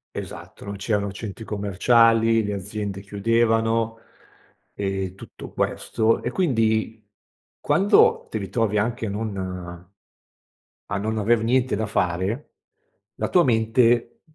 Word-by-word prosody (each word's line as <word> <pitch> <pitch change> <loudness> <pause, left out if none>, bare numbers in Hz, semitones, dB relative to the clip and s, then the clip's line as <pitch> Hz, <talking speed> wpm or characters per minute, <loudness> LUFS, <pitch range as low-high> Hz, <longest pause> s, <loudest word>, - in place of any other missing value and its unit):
Esatto, - - -8
non 100 0 -5
c'erano 100 0 -1
centri 110 +1 -7
commerciali, 115 +3 +3
le 105 - -2
aziende 100 0 -4
chiudevano 115 +2 +1 0.8
e 95 -2 -3
tutto - - -11
questo, 115 0 0
e 120 - -3
quindi 110 -8 0 0.6
quando 200 +3 +4
ti - - -3
ritrovi 105 +1 -1
anche 115 +1 -1
non 105 +1 -3 1.6
a 100 - +1
non 110 +1 -1
aver 115 +2 +3
niente 125 0 +2
da 110 +1 -1
fare, 90 -2 0 0.9
la - - -2
tua 180 - +5
mente 120 -1 +2
110 Hz, 115 wpm, -23 LUFS, 100-115 Hz, 1.6 s, tua